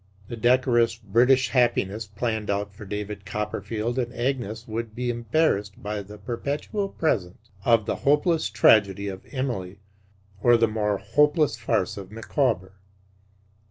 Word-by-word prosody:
The 120 - -4
decorous 120 -1 +3
British 120 +4 +3
happiness 115 -4 +1
planned 110 +1 -3
out 100 0 -1
for 105 +1 -11
David 105 0 -5
Copperfield 105 +3 -3
and 120 -1 -2
Agnes 120 -3 -2
would 110 0 -4
be 125 0 -1
embarrassed 115 -4 0
by 105 0 -3
the 105 +2 -11
perpetual 140 - -3
presence 110 - -2
of 115 -3 +4
the - - -2
hopeless 155 +3 +2
tragedy 100 -2 +4
of 95 0 -8
Emily, 120 -9 -3 0.6
or 120 +1 +6
the 115 0 +3
more 105 -1 0
hopeless 150 - +2
farce 115 -5 -1
of 95 -2 -8
Micawber. 110 - -1
115 Hz, 135 wpm, -25 LUFS, 105-125 Hz, 0.6 s, or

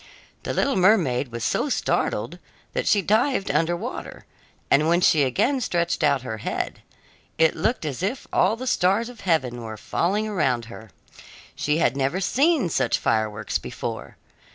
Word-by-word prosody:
The - - -4
little 275 -2 +1
mermaid 170 - +3
was 115 -1 -5
so 290 - 0
startled - - -1 0.3
that - - -2
she 200 -2 +3
dived 220 +1 +1
under 175 +1 +1
water, - - -7 0.5
and 150 +3 +4
when 170 +1 +3
she 160 -4 +4
again 190 - +1
stretched 170 -6 -1
out 140 -4 +2
her 110 -4 -5
head, - - -4 0.6
it 160 -1 +3
looked 220 +3 -1
as 145 0 -4
if 205 +8 -2
all 220 - +3
the 255 +3 -7
stars 215 0 +1
of 245 -3 -12
heaven 130 -9 0
were 110 -1 -7
falling 200 - -1
around 135 - 0
her. 110 -1 -11 0.7
She 150 +1 0
had 135 -6 +2
never 140 +6 0
seen 275 - +2
such - - +1
fireworks 110 -1 -1
before. - - -6
170 Hz, 160 wpm, -24 LUFS, 130-215 Hz, 0.7 s, and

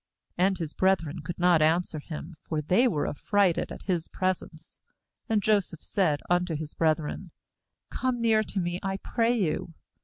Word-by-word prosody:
And 190 +2 +2
his 160 -3 -4
brethren 185 -6 +1
could 165 +4 -6
not 175 -2 +4
answer 160 0 +2
him; 155 +2 -7
for 155 - -3
they 185 - +3
were 155 -10 0
affrighted 195 +3 +1
at - - -8
his 175 -4 -1
presence. 180 -3 -4 0.5
4A.nd 220 -2 +2
Jo 215 0 +4
seph 170 -4 -8
said 160 -7 +1
unto 175 -1 +1
his 155 0 -5
brethren: 160 +3 0 0.6
'Come 255 -2 -1
near 225 -2 +3
to 205 -2 -3
me, 175 0 -2
I 195 0 -2
pray 235 +4 +1
you.' 165 -3 -1
180 Hz, 165 wpm, -28 LUFS, 160-195 Hz, 0.6 s, not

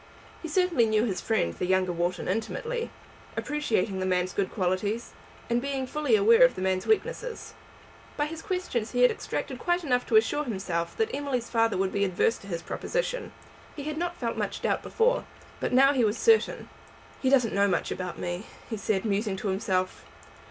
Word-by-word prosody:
He 325 - -5
certainly 335 -7 +3
knew 215 0 +2
his 195 -6 -2
friend, 85 - 0
the 180 - -3
younger 185 -1 +2
Wharton, 175 +1 -2
intimately, 465 - -2 0.5
appreciating 225 -10 0
the 185 - -1
man's 180 0 0
good 195 -2 -1
qualities, 200 +4 -1 0.3
and 235 0 +1
being 270 -1 -2
fully 300 - +1
aware 455 +4 +6
of - - +5
the - - -5
man's 185 0 0
weakness. 465 +2 -1 0.6
By 295 - +1
his 320 +1 -6
questions 305 - -2
he 245 0 +3
had 250 - +7
extracted - - -4
quite 350 0 0
enough 250 -5 +1
to - - +1
assure 300 -9 +4
himself 190 -7 -3
that 445 0 0
Emily's 265 -5 -2
father 225 -3 +2
would 190 0 0
be 200 - +1
adverse 195 +4 +1
to 195 - -13
his 170 -3 -4
proposition. - - -3 0.4
He 290 - -6
had 305 +1 -3
not 345 0 -2
felt 230 -2 -3
much - - -3
doubt - - +1
before, - - +1 0.3
but - - -1
now 270 +2 +6
he 255 -4 +2
was 215 +1 +1
certain. 450 -1 +3 0.5
"He 260 - +2
doesn't 255 -5 +3
know 200 0 +3
much 185 - 0
about 180 -1 -4
me," 175 +4 -4 0.2
he 220 - -2
said, 200 0 -1
musing 205 -1 0
to 200 - -3
himself. 190 -1 -1
230 Hz, 190 wpm, -27 LUFS, 190-305 Hz, 0.6 s, had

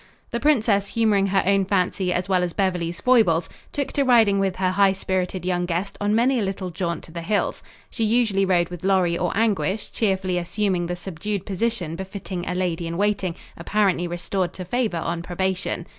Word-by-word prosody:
The 235 - -1
princess, 225 -8 +2
humoring 210 -4 +3
her 195 0 +2
own 195 0 +3
fancy 185 -1 0
as 180 +1 -1
well 185 -2 +2
as 175 -2 -2
Beverly's 180 -3 -1
foibles, 215 -10 +3 0.2
took 280 -2 -2
to 285 - +2
riding 225 -6 +4
with 195 -2 0
her 185 -1 +1
high 195 0 +4
spirited 185 -1 -2
young 175 -1 0
guest 180 +3 -2
on 205 +1 +2
many 250 +3 +3
a - - 0
little 190 -2 -3
jaunt 170 0 -3
to - - -13
the 170 0 -5
hills. 205 +5 -1 0.3
She 230 - -2
usually 220 -3 +2
rode 175 -3 +2
with 175 -1 -8
Lorry 185 -3 +2
or 180 0 -1
Anguish, 215 -2 0
cheerfully 190 -4 0
assuming 180 -1 -1
the 175 - -2
subdued 190 +2 -4
position 195 -5 -2
befitting 190 -1 -6
a 180 - -2
lady 175 -2 -1
in 165 0 -4
waiting 200 -3 0 0.2
apparently 185 0 +1
restored 175 +1 -2
to 185 - -7
favor 220 -2 -1
on 170 +1 -2
probation. 185 0 -2
190 Hz, 190 wpm, -23 LUFS, 175-205 Hz, 0.3 s, riding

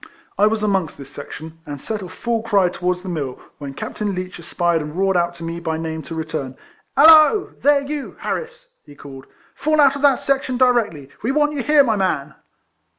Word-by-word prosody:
I 210 - +4
was 215 0 -1
amongst 190 -6 0
this 140 0 -10
section, 160 +3 -9
and 145 -2 -7
set 215 +8 -4
off 180 -3 -9
full 235 -1 -1
cry 200 -5 +2
towards 180 0 -2
the - - -8
mill, 140 -7 -4 0.2
when 140 -2 -7
Captain 205 -2 -4
Leech 185 -1 -6
espied 170 0 0
and 150 +1 -7
roared 195 0 +2
out 175 0 +1
to 170 - -10
me 165 +1 -4
by 160 -2 -2
name 160 0 -4
to 160 +3 -8
return. 155 -5 -4
— - - -31
" - - -44
Hallo! 315 +7 +7
there, 285 0 +4
you 285 0 -5
Harris! 480 +1 -5
" - - -48
he 145 - -14
called, 135 -1 -11 0.2
" - - -33
fall 310 0 +2
out 280 -2 +5
of 285 - -5
that 280 -2 +4
section 270 -2 -1
directly. 230 - +1
We 235 - 0
want 295 +1 +2
you 285 - -2
here, 295 +2 +5
my 225 -5 +1
man." 150 -7 -1
185 Hz, 220 wpm, -20 LUFS, 160-270 Hz, 0.2 s, Hallo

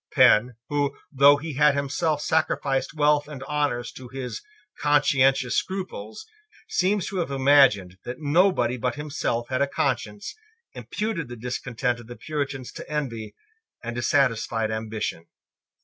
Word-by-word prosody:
Penn, 120 +3 +5
who, 145 -1 0
though 140 +1 +6
he 155 +1 -6
had 145 +1 +4
himself 145 +2 -1
sacrificed 145 -3 0
wealth 150 -1 +3
and 140 -3 -8
honours 140 -4 -1
to 130 - -11
his 130 0 -6 0.4
conscientious 135 -3 +3
scruples, 190 - -4 0.4
seems 205 - +1
to 195 - -5
have 170 -4 -1
imagined 130 -10 +4
that 125 +1 -6
nobody 145 -5 +2
but 125 +2 -1
himself 145 -5 -3
had 130 +1 -1
a 140 - +3
conscience, 110 -7 -2 0.4
imputed 210 - -3
the 120 - -8
discontent 125 +1 -2
of 120 - -12
the 120 - -8
Puritans 140 -4 -4
to - - -10
envy 115 -8 -4 0.5
and 120 0 -5
dissatisfied 115 -3 +1
ambition. 110 -6 -4
135 Hz, 135 wpm, -25 LUFS, 120-150 Hz, 0.5 s, though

